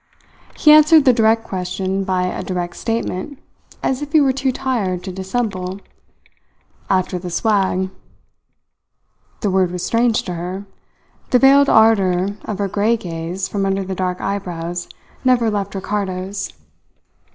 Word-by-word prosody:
He 300 - +6
answered 305 0 +7
the 255 - +6
direct 225 -1 +3
question 190 0 -3
by 185 -1 0
a 180 - -2
direct 180 -2 -4
statement, 230 +2 -3 0.5
as 265 +1 0
if 295 0 -6
he 315 - +7
were 270 -2 +3
too 270 0 0
tired 210 -9 -2
to 190 - -5
dissemble: 190 -1 -3 1.1
"After 185 -1 0
the 180 0 -6
swag." 190 -1 0 1.5
The 205 - 0
word 185 -1 +2
was 180 0 -4
strange 235 0 +2
to 180 - -5
her. 180 +4 -5 0.6
The 250 - +5
veiled 275 +2 +6
ardour 195 -4 +4 0.2
of 210 - -4
her 200 0 -1
grey 210 +4 +1
gaze 175 0 -4
from 200 0 -2
under 195 0 0
the 190 0 -4
dark 180 -1 -2
eyebrows 175 -3 -4 0.3
never 245 -3 +3
left 200 -1 -3
Ricardo's. 195 0 -3
195 Hz, 140 wpm, -19 LUFS, 185-230 Hz, 1.5 s, answered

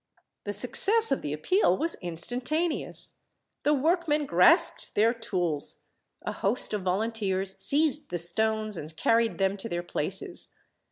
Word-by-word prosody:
The 205 - -3
success 395 - +4
of 275 - 0
the 145 - -5
appeal 185 - +1
was 330 +1 +2
instantaneous. 250 - -2 0.5
The 295 +1 +1
workmen 305 0 0
grasped 280 - +2
their 225 +3 +3
tools. 175 -10 -2 0.4
A - - -4
host 215 +4 0
of 210 - -2
volunteers 195 0 -2
seized 300 0 +3
the 175 - -3
stones 215 +4 0
and 155 +1 -9
carried 230 -1 +1
them 195 +1 0
to 230 +4 -6
their 175 -2 -4
places. 175 +2 -2
220 Hz, 135 wpm, -26 LUFS, 185-285 Hz, 0.5 s, success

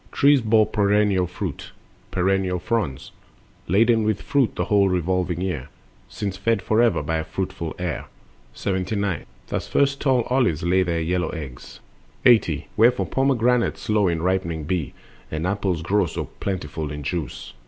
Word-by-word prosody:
Trees 140 -1 +4
bore 110 -1 +4
perennial 105 -3 +2
fruit, 90 -3 -6 0.4
perennial 95 0 +1
fronds, 90 - -2 0.6
Laden 110 +5 +4
with 105 -2 0
fruit 140 -5 +1
the - - -1
whole 100 -3 +3
revolving 90 0 0
year, 75 -8 -3 0.4
Since 100 - -4
fed 110 +1 0
forever 110 -7 +2
by 80 +2 -1
a 80 - -2
fruitful 95 -1 -4
air. 90 -2 -3 0.5
79. 95 -2 -2 0.2
Thus - - -3
first 140 0 +1
tall 130 -4 +3
olives 120 - +1
lay 90 +2 +3
their 85 -2 0
yellow 90 0 0
eggs. 70 -7 -8 0.4
80. 110 - +4
Wherefore 120 +3 +4
pomegranates 125 -3 +1
slow 105 -3 +2
in 85 -2 -1
ripening 90 -4 0
be, 80 -1 -2 0.3
And 80 +2 -3
apples 95 -4 -1
grow 95 +1 +2
so - - -4
plentiful 80 -5 -3
in 75 0 -6
juice. 80 +2 -4
95 Hz, 145 wpm, -23 LUFS, 85-110 Hz, 0.6 s, Trees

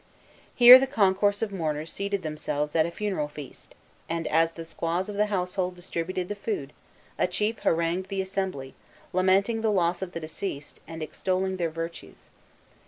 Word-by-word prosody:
Here 250 +1 +11
the 270 - 0
concourse 205 -4 +2
of 215 - -2
mourners 160 -4 -3
seated 200 -1 -2
themselves 150 -1 -3
at 160 0 +3
a - - -6
funeral 190 -5 -2
feast; 150 -1 -12 0.3
and, 165 0 -2
as 165 +1 +2
the 165 -1 -8
squaws 170 +3 -2
of 205 - -5
the 210 +1 +2
household 180 -2 -2
distributed 180 0 -4
the 205 - -3
food, 200 -9 -4 0.5
a - - +3
chief 210 +5 -1
harangued 170 +3 0
the 195 -1 -3
assembly, 190 -8 -3 0.4
lamenting 190 +5 +2
the 220 - +1
loss 175 -2 +1
of 185 -2 -5
the - - -4
deceased, 155 -2 -6
and 165 -1 -6
extolling 185 +3 -2
their 170 -2 0
virtues. 165 +1 -8
180 Hz, 170 wpm, -27 LUFS, 165-200 Hz, 0.5 s, Here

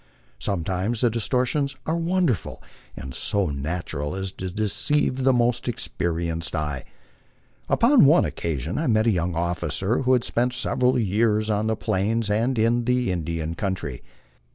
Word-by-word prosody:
Sometimes 95 - -1
the 120 -2 +3
distor 125 +3 0
tions 140 +1 -1
are 160 - 0
wonderful, 170 - -1 0.3
and 65 0 -7
so 100 0 0
natural 75 +1 -3
as 95 -1 -2
to 95 -1 -5
deceive 110 +8 +1
the 135 0 +3
most 120 -1 +1
experienced 85 -7 -2
eye. 75 -4 -3 0.8
Upon 245 - +5
one 155 +5 +5
occasion 80 - -3
I 160 - -1
met 110 -2 +3
a 115 - +4
young 90 -2 -1
officer 90 +5 -1
who 130 0 +3
had 125 -2 +3
spent 125 +1 0
several 125 +1 +1
years 110 0 +1
on 105 +1 0
the 110 - +1
Plains 110 +1 -1
and 115 +5 +1
in 115 +2 +2
the 125 -4 +1
Indian 85 -2 -3
country. 85 -9 -3
105 Hz, 155 wpm, -24 LUFS, 85-125 Hz, 0.8 s, Upon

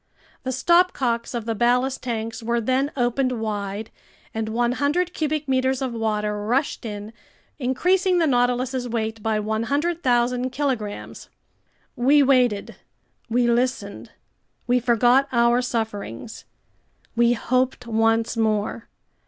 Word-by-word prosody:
The 260 - -3
stopcocks 260 -6 +2
of 230 -2 -3
the 225 - -1
ballast 250 +4 +1
tanks 230 -1 -4
were 235 +1 0
then 260 +5 0
opened 255 +1 +1
wide, 210 -1 -4 0.4
and 220 0 -3
100 285 +10 0
cubic 305 -1 -2
meters 260 0 +1
of 260 -3 -3
water 210 -2 -1
rushed 250 +4 -1
in, 210 0 -6 0.5
increasing 360 +9 +2
the 335 - +3
Nautilus's 250 -1 +1
weight 220 -1 -3
by 220 0 0
100,000 250 +2 0
kilograms. 255 -7 -4 0.7
We 280 +4 +4
waited, 250 -6 +2 0.5
we 240 +1 +2
listened, 240 -4 -1 0.6
we 250 +1 +3
forgot 245 +3 +3
our 235 0 +3
sufferings, 220 - -4 0.7
we 235 0 +4
hoped 255 +1 0
once 225 0 +1
more. 220 0 -1
240 Hz, 115 wpm, -23 LUFS, 225-260 Hz, 0.7 s, We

